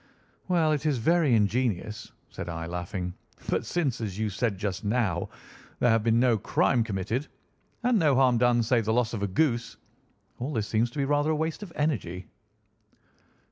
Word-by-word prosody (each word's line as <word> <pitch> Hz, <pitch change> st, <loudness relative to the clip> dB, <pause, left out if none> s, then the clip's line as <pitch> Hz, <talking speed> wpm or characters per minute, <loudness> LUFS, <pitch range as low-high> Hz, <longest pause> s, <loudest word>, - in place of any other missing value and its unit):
"Well, 170 Hz, -4 st, +2 dB
it 150 Hz, -2 st, 0 dB
is 145 Hz, -4 st, +1 dB
very 155 Hz, +1 st, +3 dB
ingenious," 105 Hz, -1 st, 0 dB, 0.2 s
said 85 Hz, -, -6 dB
I, 80 Hz, -1 st, -4 dB
laughing; 90 Hz, +1 st, -4 dB, 0.4 s
"but -, -, 0 dB
since, 140 Hz, -8 st, -1 dB
as 100 Hz, -4 st, -4 dB
you 110 Hz, -1 st, -1 dB
said 105 Hz, 0 st, -1 dB
just 95 Hz, -1 st, -3 dB
now, 105 Hz, -5 st, 0 dB, 0.5 s
there 120 Hz, -, +3 dB
has 115 Hz, 0 st, +3 dB
been 115 Hz, +1 st, +3 dB
no 120 Hz, -3 st, +3 dB
crime 120 Hz, +4 st, +2 dB
committed, 110 Hz, +6 st, -2 dB, 0.6 s
and 240 Hz, -3 st, +3 dB
no 150 Hz, -5 st, +3 dB
harm 125 Hz, -3 st, +4 dB
done 120 Hz, -1 st, +3 dB
save 115 Hz, -1 st, +2 dB
the 110 Hz, -, +1 dB
loss 120 Hz, -1 st, +1 dB
of 110 Hz, -, -3 dB
a 100 Hz, -, 0 dB
goose, 115 Hz, 0 st, 0 dB, 0.6 s
all 135 Hz, +5 st, -3 dB
this 110 Hz, -5 st, -1 dB
seems 115 Hz, +2 st, +1 dB
to 120 Hz, -, -12 dB
be 140 Hz, -, +1 dB
rather 145 Hz, +2 st, +1 dB
a 155 Hz, -, +2 dB
waste 160 Hz, +3 st, -2 dB
of 205 Hz, -5 st, -8 dB
energy." 100 Hz, -, -2 dB
115 Hz, 180 wpm, -27 LUFS, 105-140 Hz, 0.6 s, harm